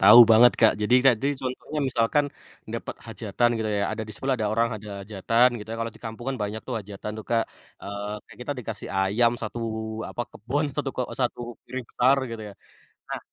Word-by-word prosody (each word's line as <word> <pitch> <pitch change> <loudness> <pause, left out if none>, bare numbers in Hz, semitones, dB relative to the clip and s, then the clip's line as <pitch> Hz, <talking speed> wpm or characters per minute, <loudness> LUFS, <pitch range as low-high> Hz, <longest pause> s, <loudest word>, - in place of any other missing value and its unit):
tahu 105 +5 +10
banget, 115 +2 +8
Kak. 110 -2 +7
Jadi, 105 +4 +3
Kak, 130 -4 +7
di 140 +1 +2
contohnya 130 +4 -4
misalkan, 130 +2 +2 0.4
dapet - - -5
hajatan 120 0 0
gitu 110 -1 -1
ya, 100 -1 +1
ada 110 +1 -3
di 110 - -8
sebelah 130 +5 +1
ada 110 -3 -1
orang 115 +2 +2
ada 105 0 -9
hajatan, 110 +4 +3
gitu 105 - -10
ya, - - -3
kalau 115 - -2
di - - -20
kampung 115 +2 -6
kan - - -5
banyak 105 +2 -3
tuh 125 - -2
hajatan 100 +1 -7
tuh, 110 - -7
Kak. 115 -1 +2 0.4
Eee, 100 +1 -5
kayak - - -15
kita 145 - -1
dikasih 110 -3 -5
ayam 100 +5 +3
1 115 +1 -4 0.4
apa 120 - -3
kebun, 135 +8 -2
satu 145 -2 -1
ke 130 - -1
e - - -6
1 125 -2 0 0.2
piring 130 +1 -5
besar 130 +3 +4
gitu 115 -1 -6
ya. - - -19 0.6
Nah, - - -3
115 Hz, 210 wpm, -26 LUFS, 105-125 Hz, 0.6 s, tahu